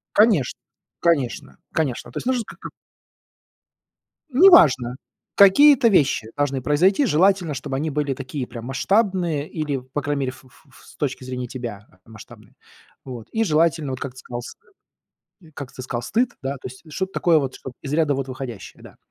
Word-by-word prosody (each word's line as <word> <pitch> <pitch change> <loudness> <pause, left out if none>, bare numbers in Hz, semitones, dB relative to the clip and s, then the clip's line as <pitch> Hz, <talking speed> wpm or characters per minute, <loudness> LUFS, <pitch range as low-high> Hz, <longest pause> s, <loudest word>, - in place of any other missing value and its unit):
Конечно, 205 - +3 0.4
конечно, 150 -8 0 0.2
конечно, 145 -7 -2
то - - -4
есть - - -8
нужен 255 -2 +1
как-то - - -10 1.6
Неважно, 155 - +6 0.4
какие-то 255 +6 +7
вещи 140 - +2
должны 140 -3 -1
произойти, 185 - +3
желательно, 180 -2 +2
чтобы 135 0 -4
они 155 +3 -2
были 145 -1 -1
такие, 130 0 -5
прям 120 -1 -9
масштабные 175 - 0
или, 150 -4 -3
по 130 +3 -5
крайней 145 0 -2
мере, 130 - -1
ф 130 - -15
ф 130 - -22
ф - - -19
с - - -17
точки 135 -3 -3
зрения 125 -1 -5
тебя 115 -5 -7 0.2
масштабные, 110 -2 -15 0.5
вот. 125 -4 -9
И 225 0 +1
желательно, 160 -4 +1
вот 130 - -6
как 135 -3 -5
ты 130 - -16
сказал, 120 0 -6
с - - -9 1.0
как 140 -3 -7
ты 130 - -8
сказал, 120 -2 -4
стыд, 240 - 0
да, 135 +1 -2
то - - -9
есть 130 - -14
что-то 190 +4 -3
такое 170 -2 +3
вот, 135 -3 -3
чтоб 130 -2 -9
из 140 - -5
ряда 150 -2 +2
вот 135 0 -3
выходящее, 130 -5 -8
да. - - -14
140 Hz, 175 wpm, -22 LUFS, 130-175 Hz, 1.6 s, какие-то